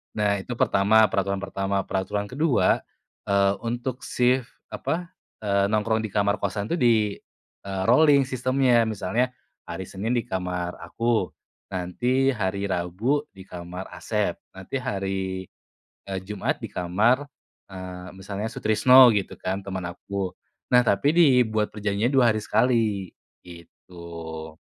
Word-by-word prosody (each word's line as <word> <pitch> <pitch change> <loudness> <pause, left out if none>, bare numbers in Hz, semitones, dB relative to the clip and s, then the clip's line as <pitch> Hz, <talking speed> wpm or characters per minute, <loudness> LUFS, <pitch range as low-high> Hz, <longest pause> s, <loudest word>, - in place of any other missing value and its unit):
Nah 105 -1 +2
itu 125 - -5
pertama, 110 +3 +4
peraturan 100 -1 -1
pertama. 100 0 -2
Peraturan 100 +2 -2
kedua, 130 - +2 0.4
eee, 100 0 +3
untuk 120 +2 -3
sif 125 +1 +2 0.2
apa, 175 +2 -3 0.3
eee, 100 -2 +1
nongkrong 110 +1 +1
di 110 - -4
kamar 100 0 +2
kosan 100 0 -3
itu 170 - 0
di, 120 -8 +4 0.7
eee, 95 -1 -4
rolling 140 +1 +5
sistemnya. 130 -1 +2
Misalnya 110 +3 -1 0.3
hari 95 -1 -6
Senin 105 +5 -3
di 120 -2 0
kamar 90 -1 -3
aku, 115 +6 0 0.4
nanti 120 +9 0
hari 100 -1 -1
Rabu 100 +11 0
di 95 -1 -14
kamar 90 +1 -7
Asep 90 +1 -2 0.2
nanti 95 +7 -8
hari, 95 -6 -3 0.6
eee, 95 -1 -3
Jumat 100 +1 -3
di - - -5
kamar, 105 +10 +1 0.4
eee, 95 -1 -8
misalnya 100 +2 -5
Sutrisno 125 +4 +6
gitu 105 -4 0
kan 95 +1 -4
teman 95 -2 -4
aku. 95 +2 -4 0.4
Nah, 125 0 +5
tapi 100 +6 +3
dibuat 125 -9 +4
perjanjiannya 105 +4 -1
2 130 -3 +5
hari 110 -1 0
sekali 110 -7 +1 0.3
gitu. 85 -2 -10
100 Hz, 130 wpm, -25 LUFS, 95-120 Hz, 0.7 s, Sutrisno